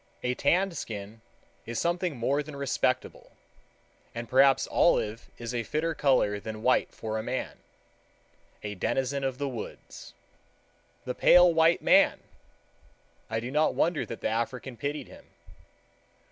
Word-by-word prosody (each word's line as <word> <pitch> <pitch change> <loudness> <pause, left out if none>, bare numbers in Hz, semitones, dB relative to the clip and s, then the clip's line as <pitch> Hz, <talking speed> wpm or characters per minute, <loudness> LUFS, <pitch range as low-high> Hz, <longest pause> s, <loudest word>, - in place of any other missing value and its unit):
A 125 - 0
tanned 185 +7 +1
skin 105 -2 -7 0.5
is 115 0 -4
something 175 -3 -1
more 135 +5 0
than 150 0 -9
respectable, 135 -2 -2 0.8
and 115 0 -5
perhaps 135 +2 +4
olive 115 -9 +1
is 120 +1 -6
a 120 - -1
fitter 155 +8 -2
color 130 -9 +2
than 110 +1 -7
white 130 - +2
for 110 0 -4
a - - -2
man—a 110 -3 -9
denizen 135 +8 -1
of 135 -1 -2
the 140 0 -2
woods. 120 -5 -9 0.9
"The 125 - -2
pale 180 +4 +6
white 165 +1 +3
man!" - - +5 1.1
I 110 0 -1
do 120 +3 -6
not 150 +2 +2
wonder 165 -2 +1
that 115 - -7
the - - 0
African 120 +3 -3
pitied 145 +6 -4
him. - - -15
130 Hz, 135 wpm, -28 LUFS, 115-150 Hz, 1.1 s, pale